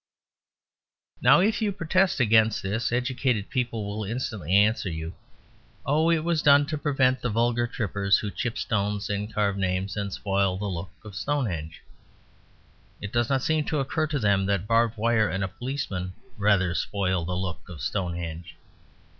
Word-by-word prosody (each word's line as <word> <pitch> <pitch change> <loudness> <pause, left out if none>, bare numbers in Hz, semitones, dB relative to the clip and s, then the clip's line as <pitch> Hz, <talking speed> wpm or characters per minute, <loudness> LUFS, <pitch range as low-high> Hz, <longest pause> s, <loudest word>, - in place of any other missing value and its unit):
Now - - +6
if 215 +4 +1
you 210 -2 +1
protest 185 0 +1
against 110 -2 +3
this, 105 +5 -1
educated 125 -3 0
people 115 -4 -1
will 105 +1 -4
instantly 110 - -4
answer 105 -1 +3
you, 80 +1 -5 0.7
"Oh, 155 +4 +2
it 165 -2 +2
was 165 -2 +1
done 145 -1 +6
to 155 +1 -3
prevent 135 -3 +2
the 125 - -1
vulgar 120 +2 +1
trippers 100 -3 +1
who 105 - -4
chip 120 +2 -3
stones 105 -1 -1
and 105 +2 -3
carve 100 -2 0
names 95 +1 -1
and 100 -1 -3
spoil 95 -1 0
the 105 - -4
look 95 -1 -4 0.2
of 105 - -9
Stonehenge." 95 - -3 1.2
It 105 - -7
does 120 -1 +1
not 135 -2 +1
seem 155 -1 +1
to 155 - -1
occur 155 +3 -1
to 150 -1 -1
them 100 -5 +2
that 100 -2 0
barbed 115 +1 +2
wire 110 0 +2
and 95 +1 -2
a - - 0
policeman 100 -4 -4 0.2
rather 100 -4 +2
spoil 95 -2 -1
the 90 +2 -3
look 95 0 -5
of 85 -4 -9
Stonehenge. 85 0 -4
105 Hz, 165 wpm, -26 LUFS, 95-130 Hz, 1.2 s, Now